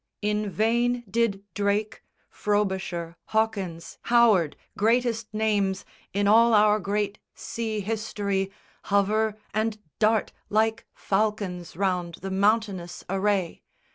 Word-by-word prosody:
In 210 0 0
vain 235 +4 +1
did 200 -1 0
Drake, 205 +1 -1 0.3
Frobisher, 190 -5 -1
Hawkins, 200 -7 -2
Howard, 220 -10 +4 0.2
greatest 230 0 +1
names 210 -3 0 0.3
In 200 +1 +1
all 230 +2 +6
our 210 0 +5
great 205 +1 -2 0.2
sea 220 -2 -3
history, 200 -2 -2 0.3
hover 210 +2 +2 0.2
and 215 +1 0 0.2
dart 220 0 +2 0.2
Like 220 +1 +1
falcons 195 -4 -1
round 180 -2 -1
the 195 +3 -6
mountainous 200 -3 0
array. 195 -3 0
210 Hz, 105 wpm, -26 LUFS, 195-220 Hz, 0.3 s, all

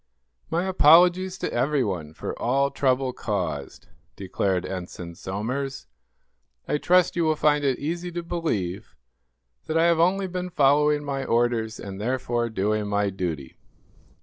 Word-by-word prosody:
"My 170 +2 0
apologies 180 +1 +5
to - - -4
everyone 115 - -1
for - - -5
all 140 +3 +1
trouble 130 -1 +1
caused," 85 - -4 0.3
declared 95 -1 -1
Ensign 90 -2 -6
Somers. 125 +10 -4 0.8
"I 150 - 0
trust 180 +2 +3
you 170 - +1
will 155 -1 +2
find 150 -1 +2
it 135 -3 +1
easy 170 +4 -4
to 175 0 -4
believe 110 - -3 0.7
that 160 - 0
I 165 - +4
have 170 -1 +3
only 190 +3 +2
been 180 0 -4
following 150 -1 +3
my 140 -1 -3
orders; 115 -2 0
and, 100 0 -7
therefore, 120 0 -1
doing 105 0 -1
my 100 -1 0
duty." 85 -8 -5
130 Hz, 140 wpm, -25 LUFS, 100-165 Hz, 0.8 s, apologies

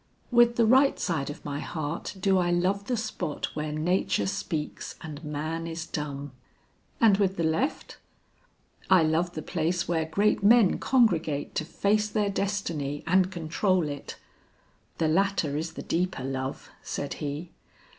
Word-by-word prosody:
"With 240 0 +5
the 235 - +4
right 265 +5 +5
side 155 -6 -1
of 145 - -8
my 145 -1 -3
heart 160 +5 -4
do 190 0 +3
I 175 -1 +1
love 185 +3 +1
the 245 +1 -1
spot 215 -9 -4
where 150 0 -2
nature 155 - +1
speaks 100 +11 -4
and 155 -1 -8
man 155 +2 -3
is 165 0 -5
dumb." 145 -3 -5 0.7
"And 215 -4 +5
with 195 -1 +1
the 170 - 0
left?" 160 - -1 0.9
"I 185 -3 +6
love 165 +3 +1
the 155 - -4
place 170 0 -1
where 165 -2 0
great 200 +8 +1
men 215 -1 +5
congregate 170 - +2
to 155 - -2
face 210 +5 +1
their 205 -1 0
destiny 170 -8 -2
and 185 +1 +3
control 175 +1 0
it." 145 -1 -6 0.8
"The 160 - +1
latter 180 -3 +1
is 160 +2 -3
the - - -7
deeper 180 -5 -1
love," 130 0 -4
said 140 - -4
he. 150 +4 -4
170 Hz, 155 wpm, -27 LUFS, 150-195 Hz, 0.9 s, I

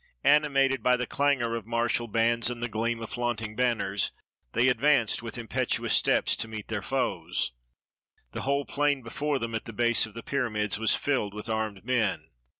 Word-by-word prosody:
Animated 135 -3 +4
by 125 0 +3
the 125 - -1
clangor 130 -5 +1
of 115 -2 -6
martial 120 0 0
bands 115 +2 +2
and 120 -1 -5
the - - 0
gleam 115 +1 -2
of 115 - -8
flaunting 115 -3 -2
banners, 115 -5 +1 0.4
they 125 - +3
ad 125 - +2
vanced 140 -8 +3
with 115 +1 -6
impetuous 115 -3 -1
steps - - +3
to - - -3
meet 110 -2 -8
their - - -2
foes. - - -1 0.8
The - - -5
whole 140 +1 0
plain 145 -2 0
before 145 +5 -1
them, 115 -3 -4
at 115 - -3
the 115 - -7
base 120 +1 +2
of 110 - -16
the 115 - -7
pyramids, 110 -7 -1
was 110 - +3
filled 105 -8 -1
with 105 +2 -6
armed 110 -3 -3
men. 115 -7 0
120 Hz, 185 wpm, -28 LUFS, 110-130 Hz, 0.8 s, Animated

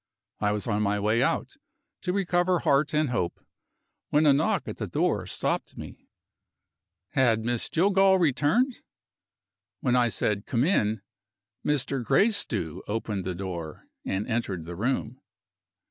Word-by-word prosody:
I 105 -1 +1
was 105 -1 -2
on 105 -2 0
my 105 0 +1
way 110 +3 +2
out, 135 - -1 0.4
to 180 - -1
recover 180 -1 +1
heart 145 -1 +2
and 150 -4 +1
hope, 90 -8 -2 0.7
when 150 +1 +3
a 145 - +7
knock 145 +4 +1
at - - -5
the - - -4
door - - 0
stopped - - -2
me. - - -10 1.0
Had 115 -4 +2
Miss 120 -1 -1
Jillgall 190 +2 +4
returned? 175 - +2 1.0
When 125 -1 +1
I 125 -1 +4
said 105 -2 -1
"Come 120 0 +1
in," 110 - +1 0.6
Mr. 140 -3 0
Gracedieu 130 - +1
opened 105 -2 -3
the 90 -1 -3
door, 85 -4 -6 0.2
and 95 +2 -2
entered 100 -8 -2
the 85 +1 -7
room. 125 +4 -2
120 Hz, 140 wpm, -27 LUFS, 105-155 Hz, 1.0 s, a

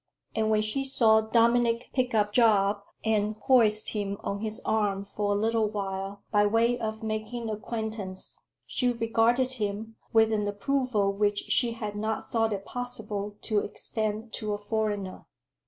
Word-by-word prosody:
And 220 0 +1
when 215 -1 +3
she 215 +6 0
saw 225 -5 +4
Dominic 235 +1 +2
pick 255 -3 0
up 210 -1 +2
Job 205 -3 +4 0.2
and 215 -1 +1
hoist 220 -4 +4
him 200 -2 -2
on 200 - -3
his 220 +1 -1
arm 205 -2 0
for 205 0 -1
a - - +1
little 225 0 +2
while, 195 -1 -4
by 205 -1 +4
way 230 +3 +3
of 220 0 -4
making 220 +1 -3
acquaintance, 215 -3 -5 0.2
she 250 -1 +1
regarded 235 +2 +2
him 220 -1 -4
with 225 0 +4
an 210 -1 0
approval 205 -1 0
which 205 0 0
she 235 -2 +3
had 210 -3 -5
not 215 +1 -2
thought 225 -1 +2
it 200 -1 -3
possible 210 -5 -4
to 215 -2 +1
extend 215 +2 -3
to 215 -2 -2
a - - -1
foreigner. 205 -2 -3
215 Hz, 155 wpm, -28 LUFS, 205-230 Hz, 0.2 s, saw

